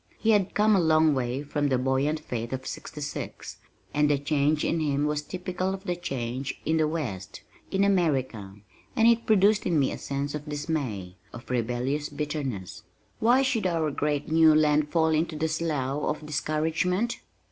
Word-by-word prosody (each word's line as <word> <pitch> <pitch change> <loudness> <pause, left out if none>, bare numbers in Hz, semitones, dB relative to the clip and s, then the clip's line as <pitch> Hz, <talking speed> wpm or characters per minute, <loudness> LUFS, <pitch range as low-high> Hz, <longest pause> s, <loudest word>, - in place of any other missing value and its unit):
He 225 - +2
had 200 -3 +2
come 210 0 +4
a - - +4
long 160 -2 +4
way 130 +1 -2
from 145 0 -1
the 130 - +2
buoyant 135 +4 0
faith 120 -5 -5
of 130 0 -4
'66, 150 -2 -6 0.4
and 150 0 +3
the 145 - +3
change 145 +1 +1
in 165 - 0
him 145 -2 0
was 150 0 0
typical 185 +3 -3
of 190 - -12
the 180 -3 -2
change 135 -5 -4
in 160 +1 +2
the 155 -1 +3
West 120 - -5 0.3
in 195 +1 +1
America 135 - 0 0.4
and 225 -2 +5
it 235 0 +3
produced 210 0 +4
in 170 -3 +2
me 140 -3 +2
a - - -6
sense 140 +1 -3
of 150 0 -6
dismay, 140 - -3 0.2
of 120 +1 -10
rebellious 125 +5 -1
bitterness. 145 - -4 0.4
Why 245 +4 +4
should 230 -7 +1
our 165 -3 0
great 145 0 -1
new 160 -1 +6
land 150 -1 +3
fall 160 -1 +2
into 160 +1 0
this 155 +1 -1
slough 145 -4 -1
of 155 0 -2
discouragement? 160 - 0
150 Hz, 175 wpm, -27 LUFS, 135-170 Hz, 0.4 s, new